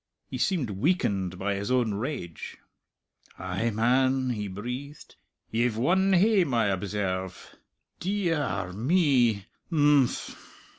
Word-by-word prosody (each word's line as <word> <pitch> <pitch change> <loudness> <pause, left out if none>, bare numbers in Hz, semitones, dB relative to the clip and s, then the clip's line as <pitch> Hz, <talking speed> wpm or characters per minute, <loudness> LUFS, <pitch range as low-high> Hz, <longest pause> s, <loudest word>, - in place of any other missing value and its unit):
He - - -4
seemed 155 - 0
weakened 100 - 0
by 100 +2 -1
his 100 +1 -3
own 125 -4 +2
rage. 100 - -5 0.8
"Ay, 95 +5 -2
man!" 130 +3 +2
he 105 -3 -3
breathed.... 125 +9 -7 0.4
"Ye've 115 0 +1
won 190 +10 +3
hame, 185 - +3
I 115 -3 +2
observe!... 95 -1 -3 0.4
Dee 195 -1 -1
ee - - +2
ar 100 - -2
me!... 120 - +2 0.3
Im 145 -4 +5
phm!" - - -7
120 Hz, 120 wpm, -27 LUFS, 100-145 Hz, 0.8 s, Im